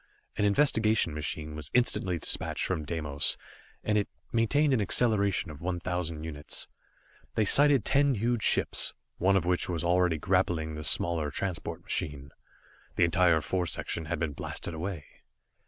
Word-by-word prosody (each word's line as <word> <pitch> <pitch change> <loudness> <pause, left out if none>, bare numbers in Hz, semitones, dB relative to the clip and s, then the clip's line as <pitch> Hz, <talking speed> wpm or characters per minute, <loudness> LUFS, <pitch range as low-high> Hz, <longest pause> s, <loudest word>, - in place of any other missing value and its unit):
An 105 - +1
investigation 110 - +3
machine 75 0 -3
was 75 -2 -6
instantly 95 -7 +2
dispatched - - -2
from 75 - -2
Deimos, 75 -3 +1 0.5
and 105 0 +2
it 100 - -3 0.2
maintained 140 +6 +2
an 120 - +2
acceleration 100 -4 +2
of 75 -1 -11
one 90 0 -2
thousand 85 -3 -3
units. 75 -2 -5 0.7
They 110 - +2
sighted 140 +1 +5
ten 140 -1 +3
huge 115 +2 0
ships, - - +2 0.2
one 95 +2 +3
of 90 - -1
which 90 +1 +1
was 85 -2 -2
already 90 -1 +2
grappling 85 -2 0
the 75 - -6
smaller 80 +2 +1
transport 85 +1 -4
machine. 70 -3 -3 0.6
The - - +3
entire 85 -2 +4
fore 90 +2 -1
section 80 0 -2
had 85 +2 -2
been 80 -4 -2
blasted 80 - -5
away. 80 -2 -5
90 Hz, 155 wpm, -29 LUFS, 80-105 Hz, 0.7 s, sighted